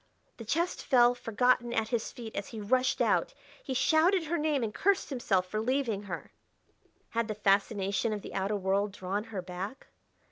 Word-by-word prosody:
The 230 - -8
chest 335 +10 -1
fell 245 -1 +5
forgotten 245 +1 +1
at 220 -1 0
his 230 -2 -1
feet 230 -3 -9
as 200 - -3
he 225 - -7
rushed 255 +5 +1
out; - - +2 0.3
he 265 - -4
shouted 320 +7 +4
her 330 +2 -1
name 300 -4 +1
and 215 -2 -2
cursed 390 -4 +1
himself 195 -8 +1
for 215 +4 -3
leaving 240 -4 0
her. 190 -5 -7 0.8
Had 230 -1 -1
the 215 - -3
fascination 200 +1 +1
of 210 -2 -4
the - - -8
outer 195 +2 -1
world 200 +1 0
drawn 200 +2 -3
her 205 -5 -5
back? 185 +7 -7
225 Hz, 180 wpm, -30 LUFS, 200-255 Hz, 0.8 s, fell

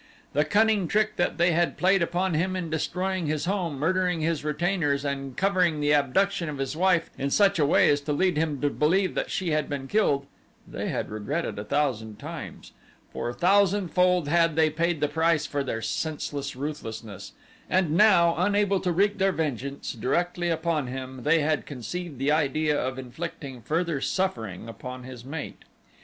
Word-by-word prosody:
The 150 +1 +2
cunning 210 +1 +3
trick 215 +2 +1
that 175 - 0
they 175 +1 +4
had 170 +1 +1
played 190 +1 +3
upon 175 +2 0
him 185 +4 0
in 175 -4 -4
destroying 180 +2 -1
his 155 +1 -1
home, 180 -6 -1
murdering 180 +2 +1
his 160 -1 -1
retainers, 150 -2 0
and 135 -2 -4
covering 185 -5 +2
the 145 0 +2
abduction 170 +5 +1
of 145 - -5
his 135 +2 -3
wife 180 -1 +2
in 140 - -1
such 195 +3 +3
a 145 - +3
way - - +5
as 145 0 +3
to 145 +1 -3
lead 180 +4 +2
him 150 -2 0
to 145 -1 +1
believe 185 +7 +2
that - - -2
she 180 -4 -2
had 150 -1 0
been 140 -2 -4
killed, 145 -8 +1 0.4
they - - -4
had - - -3
regretted 110 +5 -3
a - - -4
thousand 110 -4 -1
times, - - -8 0.4
for - - -3
a - - -4
thousandfold 180 -3 +3
had 165 0 +3
they 160 -1 +3
paid 170 0 0
the 150 - +3
price 160 0 +1
for 145 -1 -2
their 115 -4 -4
senseless 145 -1 -3
ruthlessness, 110 -8 -6 0.4
and 180 -4 +2
now, 170 -2 +5
unable 200 +1 +2
to 180 - -1
wreak 200 +4 +1
their 195 0 +3
vengeance 140 - -3
directly 175 +9 -1
upon 160 -4 0
him, 130 0 -6
they 150 +4 +3
had 155 0 0
conceived 145 - -6
the 135 +3 +1
idea 155 0 +1
of 130 -2 -2
inflicting 130 0 -7
further 160 +1 -1
suffering 115 - -2
upon 125 +2 -8
his 125 -2 -9
mate. 145 +4 -7
155 Hz, 180 wpm, -26 LUFS, 140-180 Hz, 0.4 s, way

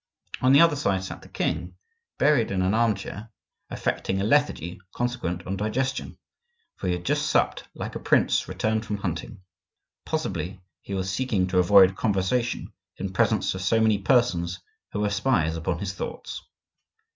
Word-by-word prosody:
On 130 - +4
the 140 +3 +8
other 165 -3 +5
side 100 -9 0
sat 95 - -7
the - - -15
king, - - -2 0.4
buried 140 -6 +3
in 95 -1 0
an 95 +2 +2
arm 115 -1 +3
chair, 110 +4 -8 0.4
affecting 95 - -1
a - - 0
lethargy 105 - +1
consequent 90 -8 -2
on 95 - -2
digestion,—for 135 - -5
he 90 - +2
had 90 0 -5
just - - +1
supped - - +1
like - - -5
a - - -4
prince - - +2
returned 110 0 -1
from 105 -2 -3
hunting; 90 -1 -5 0.6
possibly 95 - -3 0.2
he 100 - -5
was 95 -1 -2
seeking 105 -3 0
to 90 0 +1
avoid 95 0 +6
conversation 110 +5 -1 0.2
in 95 0 -4
presence - - +2
of 95 - -5
so 115 +4 +2
many 110 -2 +3
persons 95 -6 +2 0.3
who 105 - -2
were 105 - +1
spies 100 -7 +1
upon 80 +1 -2
his 95 +1 -4
thoughts. - - -6
100 Hz, 165 wpm, -25 LUFS, 95-120 Hz, 0.6 s, the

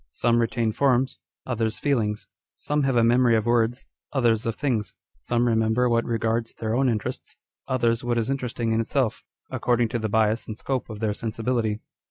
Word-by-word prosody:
Some 120 - +1
retain 115 -1 +1
forms, 130 +2 +1 0.3
others 115 -3 -1
feelings. 110 -7 0 0.3
Some 150 0 -1
have 135 -2 +1
a 115 - +4
memory 120 0 +4
of 110 -1 +1
words, 120 +1 +1 0.3
others 115 -5 +2
of 115 - -1
things. 120 -8 -1 0.2
Some 120 - 0
re 115 - +3
member 110 +2 +2
what 115 -1 +2
regards 115 0 -1
their 110 -1 -3
own 130 +2 +3
interests, 110 -3 -4 0.3
others 120 -2 +1
what 120 -1 0
is 115 +3 0
interesting 125 -4 -2
in 110 0 +2
itself, 115 -1 -1 0.3
according 120 -2 +1
to 120 - -2
the 110 -1 -2
bias 110 +1 +1
and 110 - -6
scope 130 -1 -3
of 110 -1 -7
their 110 -2 +1
sensibility. 110 0 -2
115 Hz, 185 wpm, -25 LUFS, 110-125 Hz, 0.3 s, a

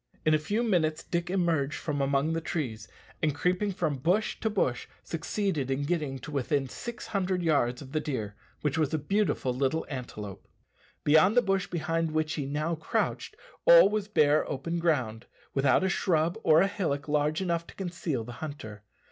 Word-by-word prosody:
In 155 - +4
a 155 - +4
few 205 +10 -1
minutes 160 -8 +1
Dick 170 0 -2
emerged 165 -6 +1
from 145 -3 -2
among 140 +3 +1
the 165 - -1
trees, 120 -10 -4 0.3
and 150 -2 +1
creeping 180 +5 +1
from 160 -7 -1
bush 180 +10 +1
to 220 - 0
bush, 160 - 0 0.2
succeeded 165 -3 -2
in 135 +1 0
getting 150 -4 -1
to 150 - -8
within 140 0 0
six 235 - -7
hundred 185 -3 -1
yards 140 -6 +1
of 130 - -12
the 155 - 0
deer, 120 -9 -3 0.3
which 150 +1 0
was 150 -3 +1
a - - +2
beautiful 195 -6 0
little 135 +5 0
antelope. 105 -8 -7 0.6
Beyond 160 +9 +5
the 245 - +6
bush 195 -1 0
behind 165 0 -1
which 155 0 0
he 140 -3 -3
now 155 +4 -1
crouched 160 -1 -2 0.3
all - - +9
was 210 -1 -1
bare 150 -7 +4
open 165 +6 -2
ground, 130 -9 0 0.3
without 135 +6 +3
a - - +2
shrub 170 -3 +1
or 155 -4 +5
a 195 - +4
hillock 165 -9 -2
large 150 +1 +1
enough 170 -3 -1
to - - -13
conceal 175 - -3
the 120 - -8
hunter. 110 -9 -7
155 Hz, 180 wpm, -29 LUFS, 140-180 Hz, 0.6 s, all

